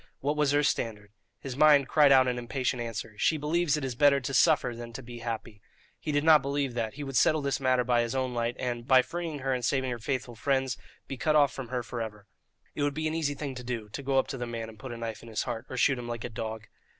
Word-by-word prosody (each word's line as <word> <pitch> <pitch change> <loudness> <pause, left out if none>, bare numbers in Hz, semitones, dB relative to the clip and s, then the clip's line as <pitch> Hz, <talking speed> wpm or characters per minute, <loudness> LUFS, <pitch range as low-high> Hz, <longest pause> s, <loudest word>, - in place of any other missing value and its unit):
What 145 +2 -1
was 150 -2 +2
her 145 +1 +3
standard? 105 -6 -1 0.3
His 135 -3 -5
mind 145 -1 +6
cried 150 -2 +5
out 130 -1 +6
an 125 -1 -1
impatient 125 +1 -2
answer. 115 -2 -5
"She 160 - +3
believes 155 +1 +1
it 145 - -3
is 130 - -3
better 140 +2 +4
to 135 +1 -5
suffer 150 -6 +3
than 115 0 -8
to 135 - -7
be 120 0 -9
happy." 115 -3 -5 0.4
He 155 - -3
did 145 0 +1
not 155 -2 +7
believe 140 -1 -1
that; 115 0 -3
he 145 - -6
would 135 -2 -6
settle 155 +3 +3
this 140 -1 0
matter 130 -2 +2
by 120 -1 +2
his 120 +2 -2
own 130 -1 -1
light, 120 0 -1
and, 120 -1 -3
by 130 -2 +6
freeing 170 -1 -4
her 135 - +2
and 125 -1 -2
saving 130 +1 0
her 120 - -4
faithful 125 +1 -3
friends, 130 +1 0 0.3
be 135 - -5
cut 155 +4 +1
off 145 -2 +4
from 135 -3 -6
her 125 0 -3
for 120 0 -5
ever. 105 -2 -7 0.5
It - - -4
would 145 -1 0
be 155 0 -1
an 155 - -2
easy 150 -3 -1
thing 140 -1 -5
to 125 -1 -8
do, 120 -3 -4
to 110 - -6
go 135 0 0
up 135 - +4
to 135 - -5
the 120 - -3
man 115 -1 -5
and 110 -2 -14
put 130 +2 -7
a 120 - -6
knife 115 -2 -5
in 115 - -12
his 110 - -1
heart, 120 0 -5
or 130 - -5
shoot 130 +1 +3
him 120 - -6
like 120 -1 -5
a - - -4
dog! 110 -1 -5
130 Hz, 280 wpm, -29 LUFS, 120-140 Hz, 0.5 s, not